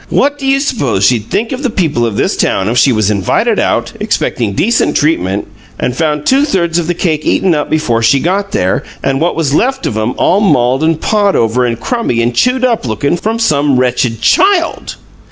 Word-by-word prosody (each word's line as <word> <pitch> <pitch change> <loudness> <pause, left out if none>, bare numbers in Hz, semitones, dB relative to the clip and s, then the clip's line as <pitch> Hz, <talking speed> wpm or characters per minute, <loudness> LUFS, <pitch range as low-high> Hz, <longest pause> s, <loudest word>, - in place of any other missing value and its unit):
What 290 +1 +1
do 270 - -4
you 270 0 +3
suppose 140 - 0
she'd 110 -2 +1
think 225 +2 -1
of 260 - -4
the 265 - -1
people 160 - 0
of 105 - -4
this - - 0
town 95 - 0
if 120 +3 +1
she 135 - +4
was 110 -3 +1
invited 100 -4 0
out, - - -1
expecting 110 -5 -1
decent 180 - +1
treatment, 100 - 0 0.3
and 125 - -2
found 150 -2 -1
two 270 +2 +3
thirds 175 - 0
of 165 - -3
the 175 - -1
cakes 155 -4 -1
eaten 185 -3 +2
up 150 -2 -2
before 125 -8 0
she 115 +5 +3
got 195 +6 -1
there, 95 - 0 0.2
and 135 +1 -1
what 170 - 0
was 150 -4 -1
left 265 - 0
of - - -2
'em 110 +3 -2
all 190 - +2
mauled 130 - +2
and 160 0 0
pawed 205 -2 +1
over 120 +2 +1
and 115 -1 -3
crummy 230 - -2
and 120 +1 0
chewed 250 - +1
up 230 - -1
lookin' 130 +9 -1
from 220 +6 -2
some 145 - +1
wretched 125 -3 -1
CHILD?" 370 - +1
150 Hz, 210 wpm, -12 LUFS, -, 0.3 s, she